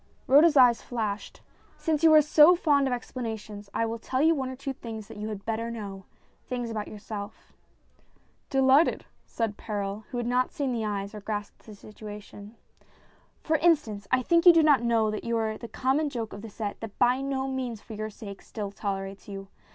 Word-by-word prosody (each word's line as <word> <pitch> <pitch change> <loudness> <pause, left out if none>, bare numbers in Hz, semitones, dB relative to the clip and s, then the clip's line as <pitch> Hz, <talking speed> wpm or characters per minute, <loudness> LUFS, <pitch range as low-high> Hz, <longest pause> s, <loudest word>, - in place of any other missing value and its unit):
Rhoda's 295 +3 +6
eyes 245 -3 +6
flashed. 215 -4 -4 0.4
"Since 315 -2 -1
you 325 - +7
are 305 - +8
so 305 +3 +7
fond 290 -5 +2
of - - -1
explanations, 220 -4 -5
I 230 - 0
will 225 0 -4
tell 255 +3 -2
you 320 +3 +5
one 265 -4 -2
or 260 - -6
two 275 +1 -5
things 220 -4 -8
that 225 - -11
you 210 +1 -4
had 205 -2 -7
better 225 +1 -2
know 200 -4 -7 0.4
things 245 -2 -3
about 215 -2 -4
yourself." 210 0 -8 0.5
" - - -38
Delighted," 270 +3 +4 0.2
said 225 -3 -2
Perral, 205 -1 -4
who 245 - -5
had 240 - -2
not 250 +1 +1
seen 280 -5 -2
the 230 -2 -2
eyes 200 -1 -3
or 210 - -8
grasped 205 +1 -6
the 215 - -10
situation. 210 0 -11 0.9
"For 315 0 +2
instance, 260 - +1
I 255 0 +3
think 335 +6 +3
you 350 - +11
do 330 -1 +5
not 290 -5 +5
know 230 -2 +2
that 215 - -4
you 235 0 -1
are 220 -1 -1
the 235 - -8
common 270 +6 0
joke 230 -5 -5
of 200 - -8
the 225 - -8
set 205 0 -5
that, 225 -3 -8
by 250 +2 +3
no 270 -1 -2
means 255 -4 -3
for 220 - -11
your 215 0 -4
sake, 200 -2 -10
still 205 -3 -6
tolerates 195 -1 -5
you. 195 -1 -8
230 Hz, 205 wpm, -27 LUFS, 210-265 Hz, 0.9 s, you